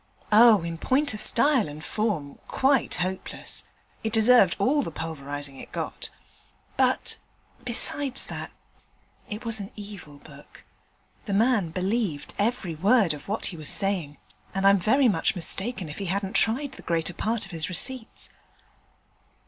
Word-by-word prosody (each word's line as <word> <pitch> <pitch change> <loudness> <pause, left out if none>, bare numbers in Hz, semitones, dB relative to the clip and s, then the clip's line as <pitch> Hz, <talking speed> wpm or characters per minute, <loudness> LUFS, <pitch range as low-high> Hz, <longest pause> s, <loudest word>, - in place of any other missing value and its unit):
'Oh, 215 -3 +7
in 165 -1 -5
point 280 - +1
of 210 - -5
style 255 - +3
and 150 +1 -9
form, 195 -10 -2
quite 270 -1 +2
hopeless. 185 +1 -3 0.4
It 220 - -1
deserved 220 -4 +5
all 280 +9 +2
the 250 - -4
pulverizing 145 -3 -5
it - - -11
got. - - -4 0.7
But, - - +2 0.4
besides 275 -3 +1
that, - - -6 0.8
it 215 +3 -6
was 225 -1 0
an 200 -1 -6
evil 200 -8 -10
book. 145 0 -15 0.6
The 200 - -1
man 220 -5 +2
believed 185 -2 -2
every 205 -5 0
word 195 +2 +3
of 145 -1 -10
what 210 +3 -2
he - - -8
was 155 -2 -5
saying, 180 -8 0 0.4
and 195 0 0
I'm 200 0 +6
very 260 +9 +3
much 205 - +1
mistaken 190 +3 -1
if 150 - -8
he 200 - -3
hadn't 195 +2 -2
tried 260 +5 +2
the - - -12
greater 170 0 -1
part 225 +4 -2
of 195 - -12
his 160 -3 -2
receipts.' 245 +6 -2
200 Hz, 150 wpm, -26 LUFS, 165-230 Hz, 0.8 s, Oh